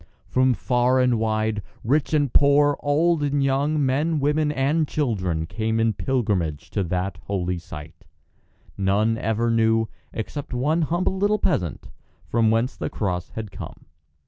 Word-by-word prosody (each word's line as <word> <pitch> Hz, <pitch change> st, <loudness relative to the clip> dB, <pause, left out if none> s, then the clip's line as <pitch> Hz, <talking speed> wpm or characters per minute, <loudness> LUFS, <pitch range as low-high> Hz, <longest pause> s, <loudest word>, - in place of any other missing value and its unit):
From 130 Hz, -1 st, +2 dB
far 125 Hz, +2 st, +2 dB
and 125 Hz, -3 st, +2 dB
wide, 110 Hz, -1 st, 0 dB, 0.2 s
rich 140 Hz, +5 st, +1 dB
and 145 Hz, -4 st, +1 dB
poor, 145 Hz, 0 st, +5 dB
old 160 Hz, +3 st, +2 dB
and 145 Hz, -1 st, +1 dB
young, 140 Hz, +2 st, +1 dB
men, 150 Hz, +5 st, +1 dB
women, 150 Hz, +1 st, +1 dB
and 150 Hz, +3 st, +1 dB
children 95 Hz, -, -1 dB
came 110 Hz, +5 st, -2 dB
in 115 Hz, -1 st, +2 dB
pilgrimage 100 Hz, -, -1 dB
to 100 Hz, -, 0 dB
that 90 Hz, 0 st, -2 dB
holy 90 Hz, -3 st, -2 dB
site. 75 Hz, -1 st, -11 dB, 0.8 s
None 100 Hz, +4 st, +2 dB
ever 115 Hz, +1 st, 0 dB
knew, 115 Hz, -1 st, +2 dB, 0.2 s
except 130 Hz, +4 st, -5 dB
one 150 Hz, +7 st, +1 dB
humble 175 Hz, +4 st, 0 dB
little 205 Hz, +2 st, +2 dB
peasant, 85 Hz, -, -1 dB, 0.4 s
from 115 Hz, -1 st, +2 dB
whence 115 Hz, +4 st, +1 dB
the -, -, -4 dB
cross 90 Hz, -4 st, -3 dB
had 110 Hz, -3 st, -5 dB
come. -, -, -9 dB
120 Hz, 145 wpm, -23 LUFS, 105-145 Hz, 0.8 s, poor